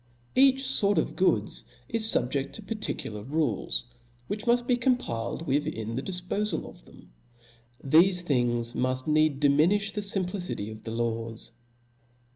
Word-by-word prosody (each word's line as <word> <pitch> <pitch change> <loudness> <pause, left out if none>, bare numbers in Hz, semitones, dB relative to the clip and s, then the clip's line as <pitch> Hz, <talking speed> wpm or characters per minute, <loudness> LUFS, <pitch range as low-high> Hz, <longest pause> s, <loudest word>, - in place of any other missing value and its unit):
Each 270 0 +5
fort 205 -7 +2
of 160 - 0
goods 110 - +1 0.2
is 225 +7 +1
fubjeft 135 - 0
to 220 - -8
particu 215 - -4
lar 105 - -6
rules, 150 +7 -1 0.4
which 210 - -4
muft 240 0 +3
be 245 - +3
complied 240 - -1
with 145 -1 0
in 110 0 -4
the 130 - -2
dif* 180 +2 -5
pofal 210 +2 -1
of - - -14
them. - - -17 0.7
Thefe 180 +6 +5
things 120 -6 0
muft 130 0 -1
needs 155 -1 +3
diminilh 170 +9 +3
the 210 - -2
fimplicity 185 - -2
of 110 0 -10
the - - -4
laws. 115 0 -3
155 Hz, 150 wpm, -28 LUFS, -, 0.7 s, Each